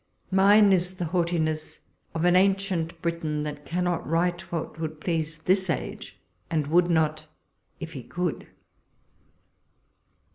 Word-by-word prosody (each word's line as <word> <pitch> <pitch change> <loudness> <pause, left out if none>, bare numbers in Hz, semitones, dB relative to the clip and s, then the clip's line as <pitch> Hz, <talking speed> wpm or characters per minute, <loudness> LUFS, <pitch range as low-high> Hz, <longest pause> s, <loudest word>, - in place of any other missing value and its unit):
Mine 200 +1 +6
is 180 0 +1
the 180 - -3
haughti 170 -1 +1
ness 155 0 -2 0.4
of 165 +1 0
an 180 0 +5
ancient 185 -3 +1
Briton, 160 -3 -1
that 150 -1 -6
cannot 175 -1 -1
write 175 +2 0
what 165 -1 -4
would 155 -1 -4
please 160 -1 -2
this 190 0 +2
age, 160 - -4 0.3
and 155 -3 0
w'ould 175 +2 +4
not, 155 -2 +1 0.5
if 165 -1 -7
he 135 - -6
could. 175 +5 -3
170 Hz, 135 wpm, -26 LUFS, 155-180 Hz, 0.5 s, Mine